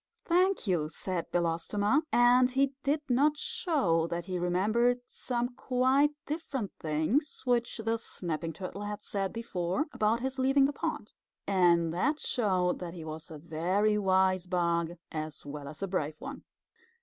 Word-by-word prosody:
"Thank 365 0 +2
you," 170 -6 +1
said 180 +1 -4
Belostoma, 175 - +1
and 245 +1 +5
he 270 +1 +1
did 290 +2 +1
not 285 +4 +3
show 185 - +1
that 170 0 -3
he 185 -1 -3
remembered 215 +8 +2
some 245 -1 -2
quite 260 +3 +2 0.2
different 280 - -3
things 160 - 0
which 240 -2 +1
the 225 0 -1
Snapping 165 -6 -3
Turtle 185 +4 -7
had 205 0 -5
said 195 -2 -2
before, 190 - -2
about 220 +2 +1
his 265 +1 -3
leaving 270 +1 +4
the 285 - 0
pond. 305 -9 -4 0.3
And 170 -4 +3
that 285 - +1
showed 185 -6 0
that 175 -1 -6
he 165 -2 -7
was 160 +2 -7
a 160 - -8
very 180 +7 +1
wise 190 -2 +2
bug 170 -2 0 0.2
as 155 -2 -5
well 145 0 -7
as 155 +6 -7
a - - 0
brave 155 -5 -2
one. - - -8
195 Hz, 155 wpm, -30 LUFS, 170-250 Hz, 0.3 s, and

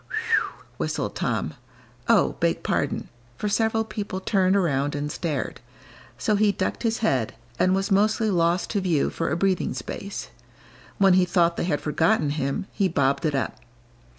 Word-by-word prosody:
"Whew!" - - -1
whistled - - -2
Tom; - - -1 0.5
"oh, - - +4
beg - - +1
pardon!" - - -1 0.3
for 210 - -2
several 220 +1 +1
people 205 -3 -4
turned 190 -1 +2
around 145 -7 +1
and 145 0 -3
stared; 150 -7 -3 0.6
so 215 - +1
he 210 0 +4
ducked 200 - -2
his 225 -1 0
head, 130 - +1 0.2
and 185 +1 +4
was 195 +2 -1
mostly 215 +2 +3
lost 170 0 +1
to 205 - 0
view 170 -6 +1
for 165 - -2
a 165 - 0
breathing 185 -7 +1
space. 195 +10 -6 0.7
When 195 -2 +5
he 185 0 +5
thought 175 -1 +2
they - - -1
had 150 -5 0
forgotten 155 0 +2
him, 140 +2 -2
he 195 - +1
bobbed 140 -2 +1
it 150 - -1
up. 135 - -2
180 Hz, 165 wpm, -25 LUFS, 150-200 Hz, 0.7 s, When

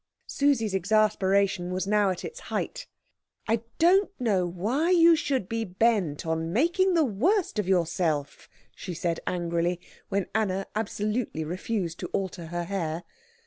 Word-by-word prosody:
Susie's 265 -8 +1
exasperation 195 -2 +2
was 185 0 -1
now 205 0 +3
at 185 - -3
its 480 - -7
height. - - -3 0.6
"I 225 0 +1 0.2
don't 380 +4 +4
know 200 -7 +1
why 220 - -1
you 340 -2 +6
should 280 - -1
be 225 +1 -2
bent 190 -6 0
on 160 0 -1
making 345 - +2
the 320 -2 +4
worst 290 - +1
of 205 - -1
yourself," 170 -5 0 0.3
she 180 -2 -6
said 170 -1 -1
angrily, 175 0 -1 0.3
when 195 -2 0
Anna 195 -3 0
absolutely 215 -4 -2
refused 180 +1 -3
to - - -4
alter 180 -3 -3
her 175 +1 -3
hair. 170 -3 -3
195 Hz, 145 wpm, -27 LUFS, 175-230 Hz, 0.6 s, you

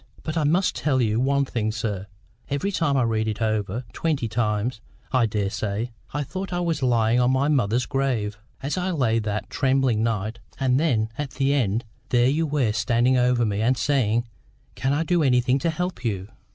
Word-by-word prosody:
But 155 - -3
I 160 -2 +1
must 175 +6 +2
tell 135 -4 +1
you 110 -2 +1
one 140 +2 +2
thing, 110 -4 -1
sir: 105 -3 -3 0.4
every 145 +8 -1
time 160 -7 +1
I 130 - +3
read 110 -1 0
it 105 -1 -2
over—twenty 115 - -1
times, 110 +1 -1 0.3
I 125 -3 +3
daresay—I 105 +4 -3
thought 185 +8 -5
I 175 - -1
was 165 -4 -1
lying 120 -2 +3
on 125 0 +3
my 130 +2 +2
mother's 125 -4 +2
grave, 125 -7 -1 0.3
as 145 +7 -1
I 180 +1 -1
lay 125 -10 +1
that 105 -1 -3
terrible 135 -1 +2
night; 110 0 -1 0.2
and 130 -1 +2
then 115 -9 +1
at 145 -2 -2
the 140 0 +2
end 115 -4 0 0.2
there 120 0 +4
you 160 +3 +1
were 140 -7 +1
standing 120 +3 +2
over 125 -1 +3
me 105 -1 -1
and 125 +3 +2
saying, 120 -5 +1 0.5
'Can 135 - -1
I 145 +3 +1
do 175 +1 +2
anything 125 -1 +3
to 165 - 0
help 175 -5 -3
you? 100 -4 -2
125 Hz, 185 wpm, -24 LUFS, 110-140 Hz, 0.5 s, there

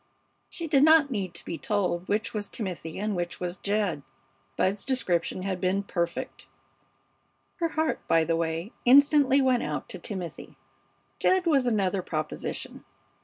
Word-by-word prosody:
She 335 - -5
did 290 -4 +3
not 315 -2 +6
need 190 -6 -3
to - - -4
be 170 - -5
told 185 -4 -1
which 210 +1 -1
was 205 -2 -4
Timothy 180 -6 -5
and 210 0 -2
which 175 -1 -3
was 180 0 -4
Jed. 200 -6 -1 0.6
Bud's 195 +2 +1
description 185 -9 0
had 190 -2 -3
been 190 +2 +1
perfect. 170 -3 -4 1.1
Her 335 - +1
heart, 315 0 -1
by 165 0 +4
the 165 +1 0
way, 165 +4 -2
instantly 280 +1 +6
went 255 -2 +3
out 150 -2 -4
to 185 - -7
Timothy. 180 -2 -6 0.6
Jed 370 -1 +3
was 275 -6 +3
another 195 -4 +1
proposition. 155 -3 -4
200 Hz, 150 wpm, -27 LUFS, 175-260 Hz, 1.1 s, not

